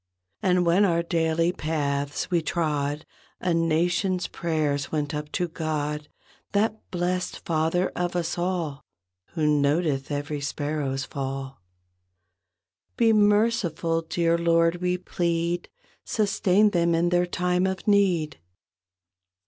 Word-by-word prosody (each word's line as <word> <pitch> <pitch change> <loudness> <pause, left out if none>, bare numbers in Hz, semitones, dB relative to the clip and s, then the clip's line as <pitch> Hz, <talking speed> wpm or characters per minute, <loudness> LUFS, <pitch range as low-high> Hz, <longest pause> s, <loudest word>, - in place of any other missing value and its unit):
And 180 -1 +2
when 175 +4 +4
our 170 -3 +2
daily 165 0 +1
paths 145 -2 -2
we 170 -2 +3
trod 150 -2 -1 0.3
A 180 -1 0
Nation's 175 +3 +1
prayers 150 -4 -1
went 150 -2 -1
up 150 0 -4
to 175 - 0
God 150 -2 -3 0.5
That 215 +2 0
blessed 180 +1 -2
Father 165 +2 +1
of 175 0 -2
us 170 -2 -1
all. 175 -5 -2 0.5
Who 160 -3 0
noteth 145 -1 +1
every 145 0 -3
sparrow's 145 -2 -2
fall. 135 - -5 1.4
"Be 225 -1 +4
merciful, 205 -6 +2
dear 170 +1 0
Lord," 165 0 +3
we 180 0 0
plead, 170 -1 -1 0.3
"Sustain 205 -1 +2
them 170 -2 +2
in 170 +1 +2
their 175 0 +2
time 180 +1 +1
of 190 +1 -4
need." 185 - +2
170 Hz, 115 wpm, -25 LUFS, 150-180 Hz, 1.4 s, when